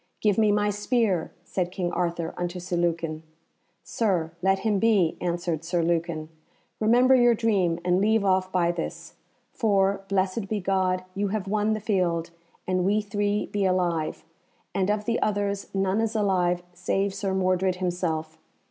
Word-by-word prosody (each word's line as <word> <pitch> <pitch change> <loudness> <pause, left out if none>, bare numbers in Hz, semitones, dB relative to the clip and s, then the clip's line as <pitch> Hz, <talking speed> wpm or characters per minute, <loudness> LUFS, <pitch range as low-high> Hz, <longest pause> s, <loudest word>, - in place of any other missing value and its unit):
"Give 210 -1 +2
me 215 -1 +4
my 205 0 +2
spear," 205 -4 0
said 180 0 -2
King 180 -2 -2
Arthur 170 -2 -2
unto 175 0 -3
Sir 180 0 -4
Lucan. 165 -2 -1 0.6
"Sir, 180 -8 0
let 195 +1 +3
him 210 -3 +2
be," 200 -7 +3
answered 170 -2 -2
Sir 170 0 0
Lucan. 165 -2 -1 0.5
"Remember 245 +4 +5
your 240 -2 +5
dream, 200 -7 +1
and 180 +1 +3
leave 220 0 +2
off 185 -1 +2
by 175 -2 +2
this. 175 -1 -6 0.4
For, 200 -3 +2
blessed 195 +2 0
be 215 +1 -1
God, 185 -1 0
you 200 +1 -1
have 200 -1 -3
won 210 +2 +1
the 215 - -2
field, 175 -5 0 0.4
and 185 -1 +1
we 205 +3 +2
three 205 0 -1
be 205 -1 -2
alive, 175 -4 0 0.5
and 190 0 0
of 210 0 0
the 230 +1 0
others 200 -1 -1
none 195 +2 +1
is 225 0 -1
alive 180 -4 +1
save 195 +3 -1
Sir 195 -1 -2
Mordred 185 0 +1
himself. 165 -3 -2
190 Hz, 160 wpm, -26 LUFS, 175-205 Hz, 0.6 s, Remember